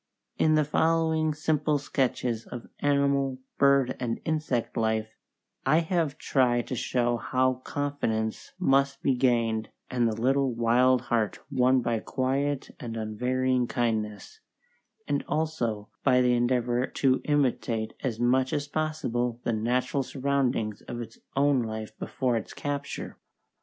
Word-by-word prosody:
In 155 0 +4
the 155 - +4
following 160 +1 +2
simple 155 -1 +1
sketches 125 -5 -1
of 120 -2 -7
animal, 140 -2 +2 0.2
bird, 140 -2 +4
and 115 -2 -2
insect 155 -7 -1
life, 110 -1 0 0.5
I 155 +5 +4
have 160 -4 -1
tried 120 -3 +2
to 130 - -2
show 120 0 0
how 130 +1 0
confidence 115 -7 -2
must 140 -5 +2
be 135 - +3
gained, 115 -3 +1 0.2
and 120 -2 +2
the 110 -1 -2
little 135 +1 +2
wild 120 +2 +4
heart 115 -4 0
won 130 -1 +3
by 115 -1 0
quiet 135 +3 -1
and 115 -2 -5
unvarying 125 +3 0
kindness, 110 - -2 0.7
and 145 -1 0
also 120 -10 -1
by 130 -2 +4
the 125 -1 +4
endeavour 120 0 +1
to 130 -1 +1
imitate 125 -6 0
as 115 -4 -2
much 130 +3 +2
as 145 -1 -1
possible 125 -6 -1
the 115 - 0
natural 125 +5 0
surroundings 130 -6 -1
of 120 - -7
its 115 -1 -8 0.2
own 140 -1 +3
life 110 -1 -5
before 125 -3 -1
its 110 - -6
capture. 140 0 -4
130 Hz, 135 wpm, -27 LUFS, 115-140 Hz, 0.7 s, In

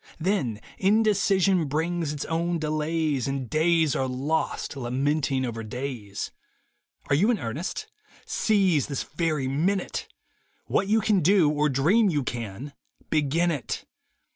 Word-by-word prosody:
Then 160 - 0 0.2
indecision 195 -3 +3
brings 160 +2 -1
its 150 -2 -4
own 170 +1 0
delays 155 -3 -1
And 135 -2 -2
days 160 +3 +2
are 130 - 0
lost 140 +5 -2
lamenting 135 +1 0
over 115 -2 -4
days. 115 -3 -5 0.8
Are - - +4
you 195 +10 +3
in 240 - +3
earnest? 150 - -4 0.4
Seize 190 - +2
this 140 -3 -3
very 150 -3 -1
minute 175 +8 -1 0.3
— - - -41
What 195 - +1
you 220 +2 +3
can 210 -2 +3
do, 175 -3 +4
or 150 0 +1
dream 175 - +3
you 150 -5 0
can, 120 +4 -5 0.4
begin 160 +3 +2
it. 145 -5 -4
155 Hz, 135 wpm, -26 LUFS, 135-175 Hz, 0.8 s, Are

